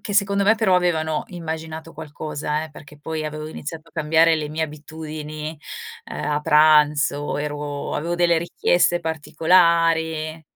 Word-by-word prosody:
Che 205 - -5
secondo 200 0 +2
me 210 +3 +5
però 215 -5 +2
avevano 160 -4 +1
immaginato 160 -2 -6
qualcosa, 150 0 -4
eh, 160 - -11
perché 150 0 -14
poi 155 +1 -4
avevo 155 0 -6
iniziato 155 +1 -7
a - - -24
cambiare 160 +2 +3
le 150 -1 -3
mie 155 +2 -2
abitudini, 155 0 -6 0.5
uhm, - - -5
a 150 0 0
pranzo, 150 -1 +4
ero 145 -1 -4
avevo 170 +4 -2
delle 175 -1 +3
richieste 175 +1 +1
particolari. 160 0 +2
160 Hz, 140 wpm, -22 LUFS, 150-165 Hz, 0.5 s, me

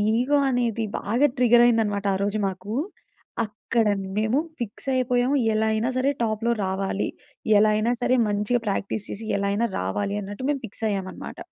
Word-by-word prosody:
Ego 260 +5 +2
అనేది 235 -3 0 0.2
బాగా 240 +8 +2
ట్రిగరయిందనమాట 230 -4 +4
ఆరోజు 200 +2 -1
మాకు. 195 +2 -6 0.7
అక్కడ 220 +2 -1 0.3
మేము 220 +5 +2 0.2
ఫిక్సయిపోయాము, 250 +3 0 0.2
ఎలా 220 0 +1
అయినా 220 +3 0
సరే 270 +2 +2
టాప్‌లో 225 +1 0
రావాలి. 195 +1 -1 0.5
ఎలా 215 +1 +5
అయినా 220 +3 +1
సరే 255 - +3
మంచిగా 210 +4 0
ప్రాక్టీస్ 200 +1 -2
చేసి, 220 +2 -5
ఎలా 200 - -1
అయినా 230 +3 +1
రావాలి 100 - -2
అన్నట్టు 205 +6 -6
మేము 280 -2 0
ఫిక్సయ్యామనమాట... 200 -3 -4
220 Hz, 135 wpm, -24 LUFS, 205-245 Hz, 0.7 s, ఎలా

